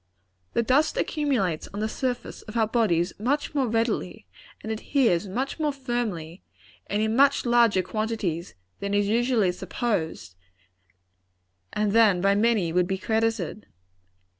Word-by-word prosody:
The 235 - +2
dust 270 +6 +2
accumulates 250 - 0
on - - -3
the 215 - 0
surface 250 +2 -4
of 215 +1 -7
our 225 - +4
bodies 205 -6 +1
much 285 +8 -1
more 275 -4 +1
readily, 225 - -1 0.4
and 220 - -4
adheres 220 - +1
much 255 - -3
more 305 -1 +1
firmly, 235 - -4 0.5
and 205 +1 0
in 220 +1 0
much 280 +1 +4
larger 235 -6 +4
quantities, 210 - -3 0.2
than 200 0 -2
is 205 0 +2
usually 230 -3 +2
supposed, 180 - -3 1.4
and 210 -1 0
than 215 -4 +5
by 195 +2 +3
many 205 -5 +2
would 180 0 +2
be 190 0 -1
credited. 220 -1 -1
220 Hz, 140 wpm, -25 LUFS, 190-240 Hz, 1.4 s, than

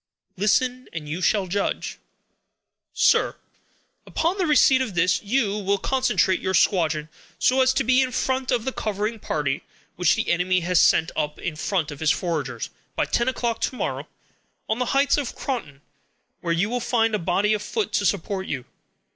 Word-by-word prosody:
"Listen, 250 +6 +1
and 155 -3 -6
you 160 +5 -4
shall 200 +1 +2
judge." 195 +3 -2 1.0
"SIR,—Upon 350 +5 -1
the 365 - +1
receipt 275 -3 +5
of 220 -8 -3
this, 175 +1 +2
you 210 -1 0
will 200 0 +1
concentrate 245 -5 +1
your 190 0 -1
squadron, 160 -6 +2 0.3
so 260 +1 +3
as 260 0 +4
to 270 +1 +1
be 260 +2 +4
in 260 -1 0
front 260 +1 -1
of 240 -3 +1
a 265 - -1
covering 215 0 -3
party 145 -6 -2 0.4
which 180 -1 +3
the 225 - -1
enemy 180 +1 +1
has 175 0 +3
sent 160 - +4
up 150 0 -2
in 155 - -4
front 165 -1 -1
of 145 - -9
his 160 - +1
foragers, 145 - -2 0.2
by - - +1
ten 235 +2 +1
o'clock 235 -2 -2
to - - -1
morrow, - - -3 0.6
on 220 +2 -1
the 250 - +1
heights 280 +1 +3
of 285 -4 -3
Croton, 150 - -4 0.6
where 170 - -2
you 170 +5 +1
will 245 +3 -2
find 225 -2 +1
a 210 - +1
body 190 +5 +1
of 210 - -1
foot 435 - -2
to - - +1
support 195 0 -1
you. 130 -3 -4
205 Hz, 180 wpm, -24 LUFS, 175-255 Hz, 1.0 s, receipt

